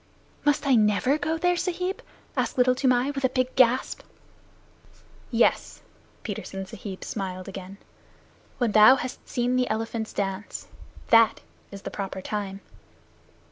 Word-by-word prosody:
"Must 290 Hz, 0 st, +2 dB
I 275 Hz, -, +4 dB
never 225 Hz, +6 st, +3 dB
go 315 Hz, +2 st, -1 dB
there, 355 Hz, +2 st, +2 dB
Sahib?" 360 Hz, +2 st, -2 dB, 0.3 s
asked -, -, -1 dB
Little 250 Hz, 0 st, +5 dB
Toomai 255 Hz, +1 st, +2 dB
with 275 Hz, -1 st, -5 dB
a 260 Hz, -, +4 dB
big 255 Hz, 0 st, -1 dB
gasp. 255 Hz, 0 st, +3 dB, 1.3 s
"Yes." -, -, +1 dB, 0.4 s
Petersen 195 Hz, -2 st, -5 dB
Sahib 195 Hz, -1 st, -8 dB
smiled 185 Hz, -3 st, -5 dB
again. 195 Hz, 0 st, -8 dB, 0.8 s
"When 240 Hz, -4 st, +1 dB
thou 215 Hz, +5 st, +8 dB
hast 255 Hz, -1 st, -6 dB
seen 245 Hz, +1 st, 0 dB
the 250 Hz, -1 st, +1 dB
elephants 220 Hz, 0 st, -3 dB
dance. 195 Hz, 0 st, -4 dB, 0.4 s
That 230 Hz, -1 st, +5 dB, 0.3 s
is 200 Hz, -1 st, -10 dB
the -, -, -5 dB
proper 195 Hz, -1 st, -5 dB
time. 200 Hz, 0 st, -4 dB
230 Hz, 135 wpm, -26 LUFS, 200-260 Hz, 1.3 s, thou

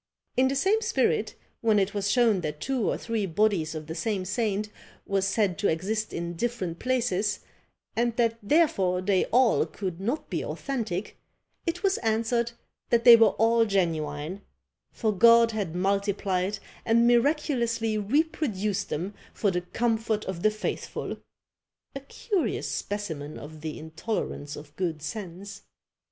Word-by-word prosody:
In 260 Hz, +1 st, +4 dB
the 270 Hz, -, -1 dB
same 390 Hz, +10 st, +2 dB
spirit, -, -, +1 dB, 0.3 s
when 220 Hz, -2 st, +3 dB
it 200 Hz, 0 st, +1 dB
was 200 Hz, -1 st, -1 dB
shown 225 Hz, -5 st, +3 dB
that 150 Hz, -2 st, -4 dB
two 255 Hz, +2 st, 0 dB
or -, -, 0 dB
three 225 Hz, -4 st, -2 dB
bodies 175 Hz, -3 st, +1 dB
of 155 Hz, -1 st, -5 dB
the 160 Hz, -, -5 dB
same 185 Hz, +3 st, -2 dB
saint 210 Hz, +1 st, -1 dB, 0.4 s
was 195 Hz, -1 st, +1 dB
said 195 Hz, -3 st, +1 dB
to 205 Hz, -, +2 dB
exist 210 Hz, +7 st, -1 dB
in 170 Hz, 0 st, -4 dB
different 185 Hz, -4 st, -3 dB
places, 225 Hz, -5 st, 0 dB, 0.5 s
and 235 Hz, 0 st, +1 dB
that 230 Hz, -1 st, +1 dB
therefore 200 Hz, -, +2 dB
they 190 Hz, -1 st, +2 dB
all 245 Hz, -1 st, +4 dB
could 185 Hz, -4 st, -5 dB
not 240 Hz, +10 st, -2 dB
be -, -, -2 dB
authentic, 220 Hz, -8 st, -4 dB, 0.5 s
it 350 Hz, +3 st, -2 dB
was 390 Hz, -1 st, +2 dB
answered 230 Hz, +1 st, 0 dB, 0.4 s
that 235 Hz, -1 st, +3 dB
they 240 Hz, -1 st, +11 dB
were 225 Hz, -1 st, +5 dB
all 230 Hz, +1 st, +4 dB
genuine; 165 Hz, -3 st, -1 dB, 0.5 s
for 220 Hz, -2 st, 0 dB
God 230 Hz, +2 st, +6 dB
had 200 Hz, -7 st, -3 dB
multiplied 195 Hz, 0 st, 0 dB, 0.3 s
and 235 Hz, +1 st, +4 dB
miraculously 240 Hz, -3 st, +2 dB
reproduced 215 Hz, -, 0 dB
them 180 Hz, +7 st, -3 dB, 0.2 s
for 200 Hz, -, +1 dB
the 180 Hz, -1 st, -1 dB
comfort 225 Hz, +2 st, -1 dB
of 185 Hz, -3 st, -4 dB
the 215 Hz, -, +4 dB
faithful! 215 Hz, 0 st, -4 dB, 0.8 s
A 275 Hz, -, -5 dB
curious 360 Hz, -, -2 dB
specimen 160 Hz, -8 st, -4 dB
of 155 Hz, +1 st, -10 dB
the 155 Hz, -1 st, -5 dB
intolerance 160 Hz, -2 st, -4 dB
of 150 Hz, 0 st, -12 dB
good 165 Hz, -4 st, -2 dB
sense. 195 Hz, +1 st, -7 dB
210 Hz, 145 wpm, -27 LUFS, 180-235 Hz, 0.8 s, they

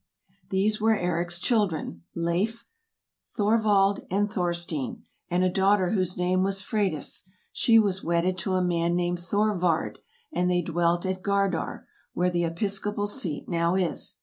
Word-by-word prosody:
These 210 Hz, +3 st, +1 dB
were 220 Hz, 0 st, +4 dB
Eric's 175 Hz, -1 st, 0 dB
children: 180 Hz, -, 0 dB
Leif, 180 Hz, +8 st, -1 dB, 0.7 s
Thorvald, 205 Hz, -2 st, +3 dB
and 205 Hz, +2 st, 0 dB
Thorstein, 170 Hz, -, -2 dB, 0.3 s
and 180 Hz, +1 st, +1 dB
a -, -, +4 dB
daughter 190 Hz, 0 st, +2 dB
whose 185 Hz, -4 st, 0 dB
name 180 Hz, +1 st, +1 dB
was 195 Hz, 0 st, 0 dB
Freydis; 195 Hz, -, -2 dB, 0.2 s
she 230 Hz, -1 st, +4 dB
was 200 Hz, -4 st, +2 dB
wedded 170 Hz, +2 st, +1 dB
to 185 Hz, +2 st, -1 dB
a 185 Hz, -, +2 dB
man 170 Hz, -1 st, +1 dB
named 175 Hz, 0 st, 0 dB
Thorvard, 180 Hz, -2 st, 0 dB, 0.3 s
and 180 Hz, -7 st, +1 dB
they 175 Hz, -1 st, +1 dB
dwelt 170 Hz, +1 st, 0 dB
at 185 Hz, 0 st, -2 dB
Gardar, 195 Hz, -3 st, -1 dB, 0.3 s
where 180 Hz, +1 st, +1 dB
the 175 Hz, -1 st, 0 dB
episcopal 200 Hz, +4 st, -2 dB
seat 175 Hz, -7 st, -2 dB
now 170 Hz, +1 st, +1 dB
is. 185 Hz, -3 st, -1 dB
185 Hz, 145 wpm, -26 LUFS, 175-200 Hz, 0.7 s, were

